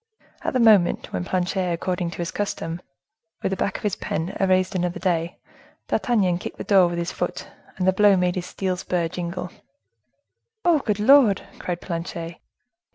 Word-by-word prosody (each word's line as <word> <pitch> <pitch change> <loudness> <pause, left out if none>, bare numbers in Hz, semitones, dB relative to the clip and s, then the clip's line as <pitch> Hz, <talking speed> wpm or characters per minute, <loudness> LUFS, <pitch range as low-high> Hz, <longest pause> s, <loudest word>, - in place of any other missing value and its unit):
At - - -2
the 255 - +2
moment 215 -7 +4
when 90 - -1
Planchet, 185 - -1
according 175 +1 -2
to - - -9
his 175 +1 -3
daily - - -9
custom, 170 -4 -3 0.6
with - - 0
the - - 0
back 195 +1 -1
of - - -13
his 205 -3 0
pen, 160 +4 -3
erased 185 0 +2
another 180 -1 -1
day, 170 -2 -1 0.5
D'Artagnan 190 -8 +1
kicked - - -7
the - - -5
door 190 -3 +5
with 175 0 -3
his 170 +1 -2
foot, - - -4 0.3
and 185 - 0
the 190 - +5
blow 205 0 +5
made 180 -1 +1
his 180 -1 -4
steel 185 -2 -2
spur 180 -2 -1
jingle. 175 +1 -5 1.1
"Oh! 340 -3 +5
good 210 -6 -1
Lord!" 230 -3 +5 0.2
cried 175 -1 -4
Planchet. 170 -1 -5
180 Hz, 180 wpm, -23 LUFS, 175-195 Hz, 1.1 s, door